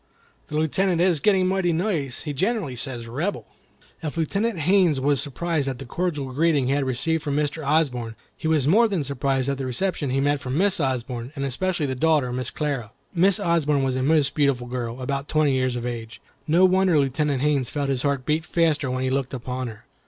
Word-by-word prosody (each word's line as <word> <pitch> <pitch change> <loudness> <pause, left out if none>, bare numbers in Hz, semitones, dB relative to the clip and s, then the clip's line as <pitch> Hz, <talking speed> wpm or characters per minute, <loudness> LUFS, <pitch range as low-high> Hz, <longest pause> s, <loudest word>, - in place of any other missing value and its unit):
The 150 - -3
Lieutenant 170 +3 +1
is 175 -3 +3
getting 190 +1 +3
mighty 185 -2 +1
nice; 160 - -1
he 150 - -4
generally 190 - -1
says 120 -2 -3
'Rebel.' 150 - -3 0.3
" - - -31
If 160 0 -5
Lieutenant 200 +6 0
Haines 175 -3 +3
was 140 0 +2
surprised 155 0 -2
at 135 -2 -2
the 135 - -8
cordial 145 -2 -2
greeting 150 -2 +2
he 130 - 0
had 140 -1 +1
received 155 +6 0
from 145 -2 -2
Mr. 150 +1 -1
Osborne, 135 -6 0 0.2
he - - -4
was 155 -4 +2
more 225 +9 +5
than 190 -8 -1
surprised 135 -1 -1
at 140 -1 -1
the 135 - -2
reception 150 +2 -1
he 135 +1 0
met 145 +1 +1
from 130 +1 -3
Mrs. 190 -3 +3
Osborne, 125 -1 -3
and 140 -1 -2
especially 175 +4 -1
the 130 - -2
daughter, 140 -2 +1
Miss 125 -1 -2
Clara. 140 -8 -3 0.2
Miss 185 +1 +3
Osborne 150 -5 +1
was 130 -1 0
a 130 - -1
most 145 0 +2
beautiful 140 -4 +1
girl, 120 0 -4
about 140 +2 -3
twenty 155 -3 +2
years 130 -1 0
of 120 0 -4
age. 115 -2 -6 0.3
No 170 +4 +5
wonder 185 -2 +3
Lieutenant 140 0 +1
Haines 145 -4 +1
felt 145 -2 -2
his 130 -2 0
heart 140 -2 -1
beat 155 +1 +1
faster 160 -5 +1
when 130 +1 -2
he 130 - 0
looked 135 0 -1
upon 125 0 -4
her. 110 -2 -10
145 Hz, 210 wpm, -24 LUFS, 130-165 Hz, 0.3 s, more